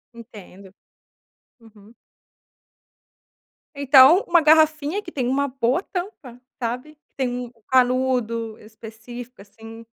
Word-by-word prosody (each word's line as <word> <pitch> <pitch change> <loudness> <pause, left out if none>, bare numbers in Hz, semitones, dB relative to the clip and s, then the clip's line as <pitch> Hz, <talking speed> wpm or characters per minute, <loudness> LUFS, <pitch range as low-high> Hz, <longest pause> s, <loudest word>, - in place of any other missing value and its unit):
Entendo. 200 -4 -14 0.9
Uhum. 220 -1 -19 1.8
Então, 280 +6 +6
uma 345 -1 +4
garrafinha 310 +3 +2
que 345 - -10
tem 255 -6 -3
uma 280 +2 -1
boa 260 +6 -1
tampa, 350 - -8 0.2
sabe? 250 +5 -5
Que 300 - -56
tem 265 - -1
um 245 -1 -6 0.2
canudo 250 -3 0
específico, 225 +2 -12
assim. 225 +3 -14
250 Hz, 100 wpm, -22 LUFS, 225-285 Hz, 1.8 s, Então